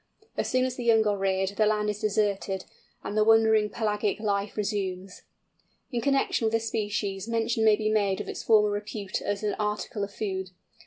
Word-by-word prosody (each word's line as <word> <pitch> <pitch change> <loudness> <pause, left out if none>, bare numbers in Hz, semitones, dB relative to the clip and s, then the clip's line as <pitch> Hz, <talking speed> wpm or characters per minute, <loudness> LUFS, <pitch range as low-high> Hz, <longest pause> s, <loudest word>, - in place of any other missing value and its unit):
As - - -1
soon 255 0 +2
as 255 -1 -3
the 245 - -4
young 225 -2 +4
are 205 -1 +2
reared 190 -1 0
the 210 +2 +1
land 210 0 +1
is 210 0 -2
deserted, 205 -3 0 0.4
and 205 - -4
the 215 - +4
wandering 220 -1 +4
pelagic 210 -1 -1
life 200 -1 -1
resumed. 195 -3 -2 0.8
In 240 -2 -1
connection 275 -2 +1
with 220 - -2
this 225 0 0
species 205 -2 -2
mention 230 0 0
may 215 -1 +6
be 215 0 -2
made 200 -3 +1
of - - -5
its - - -5
former 210 -2 +4
repute 205 -1 -4
as 205 +1 -3
an 210 -1 0
article 210 0 -2
of 200 - -4
food. 190 -3 -4
210 Hz, 195 wpm, -27 LUFS, 200-220 Hz, 0.8 s, may